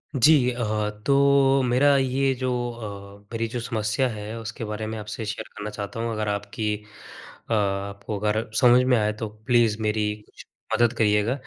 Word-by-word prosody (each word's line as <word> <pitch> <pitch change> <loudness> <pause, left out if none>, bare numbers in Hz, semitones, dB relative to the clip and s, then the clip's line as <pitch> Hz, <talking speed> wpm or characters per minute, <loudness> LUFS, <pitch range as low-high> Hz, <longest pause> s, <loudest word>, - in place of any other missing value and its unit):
जी 140 +5 +6 0.2
अ, 120 0 -3 0.4
तो 140 -1 +4
मेरा 140 +4 +4
ये 135 +1 +1
जो 130 0 -2 0.2
अ, 100 -3 -9
मेरी 115 0 -1
जो 120 +1 -4
समस्या 115 +2 0
है, 110 0 -6
उसके 115 +1 -6
बारे 105 0 -4
में 110 0 -4
आपसे 110 +1 -6
शेयर 105 - -5
करना 105 +1 -4
चाहता 105 +1 -6
हूँ। 115 0 -2
अगर 110 -1 -2
आपकी 105 +2 -2 0.8
अ, - - +1
आपको 100 0 -2
अगर 110 +2 -1
समझ 125 0 +6
में 125 -1 +3
आए 105 -1 +1
तो 110 - -2 0.2
प्लीज़ 120 -3 +3
मेरी 105 -1 0
कुछ - - -15 0.3
मदद 120 0 +3
करिएगा। 105 0 +2
110 Hz, 175 wpm, -24 LUFS, 105-125 Hz, 0.8 s, जी